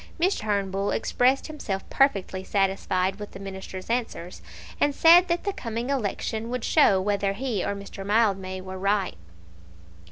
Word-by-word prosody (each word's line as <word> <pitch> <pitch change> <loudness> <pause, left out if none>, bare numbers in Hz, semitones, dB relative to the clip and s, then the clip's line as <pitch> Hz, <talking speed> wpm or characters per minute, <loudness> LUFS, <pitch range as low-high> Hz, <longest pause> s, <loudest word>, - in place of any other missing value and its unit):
Mr. 370 +4 +2
Turnbull 200 -2 -1
expressed 255 +4 +1
himself 215 -11 -5
perfectly 195 -8 +1
satisfied 190 -1 0
with 210 -1 -8
the - - -9
Minister's 190 -1 -7
answers, 225 -7 -3 0.4
and 290 -1 +2
said 345 +2 +7
that 345 0 -1
the 400 - -1
coming 235 0 -4
election 225 -2 -2
would 250 -1 -3
show 205 -11 +4
whether 200 0 0
he 230 -3 -2
or 200 - -2
Mr. 200 0 -8
Mildmay 195 -3 +1
were 185 0 -7
right. 195 0 0
205 Hz, 150 wpm, -25 LUFS, 195-250 Hz, 0.4 s, said